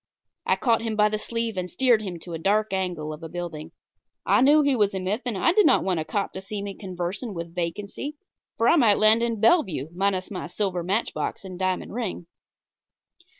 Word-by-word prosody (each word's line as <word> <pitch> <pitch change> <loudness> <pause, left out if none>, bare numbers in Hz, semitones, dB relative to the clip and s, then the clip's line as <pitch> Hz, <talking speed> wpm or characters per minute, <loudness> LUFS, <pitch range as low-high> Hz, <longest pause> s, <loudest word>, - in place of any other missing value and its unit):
I - - +4
caught 230 -3 +1
him 225 -1 -2
by 210 0 +4
the 215 0 -2
sleeve 230 -1 -3
and 180 0 -3
steered 245 -2 +3
him 185 -5 -5
to 175 - -8
a 165 - -4
dark 205 +4 +1
angle 175 -5 -2
of 155 - -10
a 165 - -7
building. 165 -2 -6 0.5
I - - +4
knew 295 +3 +6
he 280 -2 +2
was 205 -4 +1
a - - -1
myth, 195 +6 -2
and 225 -5 -1
I 330 - +3
did 420 +1 +5
not - - +4
want 185 -3 0
a - - -1
cop 200 +5 -2
to 190 - -6
see 200 +1 -5
me 200 -1 -5
conversing 190 +3 -5
with 170 0 -6
vacancy, 200 - -4 0.4
for 230 - +2
I - - +5
might 225 -8 +5
land 215 +2 +5
in 230 -2 -1
Bellevue 195 - +2
minus 190 +1 -1
my 185 - -5
silver 190 -4 -2
matchbox 195 +2 -2
and 185 -1 -8
diamond 185 0 -1
ring. 220 -7 -4
200 Hz, 215 wpm, -25 LUFS, 180-225 Hz, 0.5 s, knew